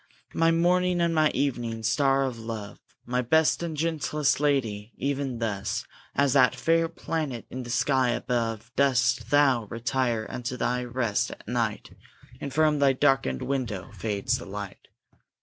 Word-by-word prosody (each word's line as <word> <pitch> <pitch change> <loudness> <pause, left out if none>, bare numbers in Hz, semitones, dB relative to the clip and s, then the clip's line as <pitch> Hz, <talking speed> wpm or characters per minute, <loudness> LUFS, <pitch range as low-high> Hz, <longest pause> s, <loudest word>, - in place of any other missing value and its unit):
My 165 0 +3
morning 180 +2 +2
and 170 -1 +2
my 155 -1 +4
evening 120 -6 -2
star 135 +4 +2
of 125 -3 -4
love! 110 -3 -6 0.3
My 125 +1 0
best 160 +7 +3
and 165 -3 -4
gentlest 150 -3 0
lady! 115 -7 0
even 135 -2 -2
thus, 105 -4 -2 0.3
As 140 -2 +3
that 130 -3 +5
fair 165 0 +2
planet 155 -7 -4
in 130 - -5
the 120 - -8
sky 130 +1 +2
above, 115 -1 -2
Dost 125 -4 +2
thou 135 -5 +4
retire 120 0 -1
unto 125 +1 -5
thy 125 0 0
rest 120 -4 -1
at - - -11
night, 115 -2 -2 0.5
And 140 - -5
from 150 0 +2
thy 140 -1 +4
darkened 130 - +1
window 125 -8 -3
fades 100 0 -1
the - - -9
light. - - -7
130 Hz, 150 wpm, -27 LUFS, 115-145 Hz, 0.5 s, that